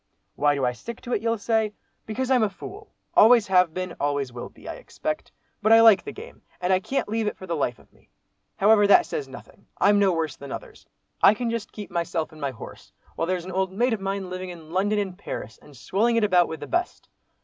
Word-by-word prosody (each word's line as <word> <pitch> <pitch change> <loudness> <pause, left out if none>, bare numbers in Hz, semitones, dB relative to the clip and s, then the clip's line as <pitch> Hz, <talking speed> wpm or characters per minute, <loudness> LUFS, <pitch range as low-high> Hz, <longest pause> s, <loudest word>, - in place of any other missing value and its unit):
Why 145 0 +2
do 135 -2 0
I 125 - +2
stick 230 - -8
to 245 - -5
it, - - 0
you'll 230 0 0
say? 220 0 0 0.3
Because 255 +4 -2
I'm 255 -2 +4
a 215 - +2
fool, 390 - -11 0.2
always 230 0 +7
have 180 -3 +4
been, 185 +1 -5
always 140 -3 -1
will 120 - -7
be, - - -16
I - - -4
expect. 310 -10 -5 0.3
But 215 +2 +2
I 225 0 +8
like 225 -4 +7
the 425 - -6
game, 450 +4 -12 0.2
and 180 +1 +1
I 185 - +4
can't 265 +8 -2
leave 220 +1 -1
it - - -3
for 190 - -9
the 170 -2 -2
life 125 -6 -1
of - - -23
me. - - -28 0.5
However, 205 +1 +5
that 345 - +6
says 445 -3 -4
nothing. - - -14
I'm 205 0 +4
no 195 -2 +4
worse 160 -4 -2
than 140 -1 -9
others. - - -9 0.3
I 205 - +7
can 235 0 -2
just 230 -3 -4
keep 205 -4 -9
myself 170 -1 -2
and 155 -1 -14
my 140 - 0
horse, 125 -4 -11 0.2
while 165 - -1
there's 180 -1 -2
an 185 - -6
old 190 0 -1
mate 240 +4 +1
of 215 - -3
mine 195 -1 -3
living 185 0 -5
in 165 -3 -11
London 200 +4 +1
and 195 -3 -2
Paris, 110 - -7
and 145 -3 -16
swelling 220 - +1
it 230 - +2
about 180 -4 +4
with 160 - -7
the - - -4
best! 355 +2 -2
195 Hz, 245 wpm, -25 LUFS, 170-225 Hz, 0.5 s, I